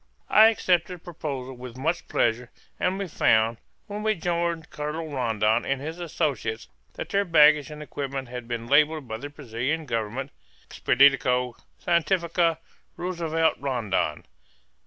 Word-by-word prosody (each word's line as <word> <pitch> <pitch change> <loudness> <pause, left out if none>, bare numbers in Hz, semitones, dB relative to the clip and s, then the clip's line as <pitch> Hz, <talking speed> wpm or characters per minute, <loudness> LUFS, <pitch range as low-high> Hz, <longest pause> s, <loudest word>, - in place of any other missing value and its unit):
I 215 +1 +8
accepted 180 -5 +1
the 175 - -18
proposal 140 -7 -5
with 125 0 -9
much 165 +6 -1
pleasure; 120 +1 0 0.3
and 185 +1 0
we 200 -1 -3
found, 110 -7 +2 0.3
when 210 -1 -6
we 215 0 +1
joined 170 -1 -2
Colonel 155 +2 -4
Rondon 115 -4 +1
and 135 -1 -1
his 160 +5 -6
associates, 140 -9 -2 0.3
that - - -6
their 200 0 +2
baggage 150 -4 +5
and 150 0 -8
equipment 135 -2 -5
had 125 -1 -7
been 120 -1 -4
labelled 150 +2 +3
by 110 -1 -4
the 145 +5 -7
Brazilian 145 +2 -3
Government 115 +1 -3 0.4
"Expedicao 125 -2 +3 0.3
Scientifica 170 -1 +1 0.4
Roosevelt 165 -3 0
Rondon." 120 -8 -1
150 Hz, 135 wpm, -26 LUFS, 125-170 Hz, 0.4 s, I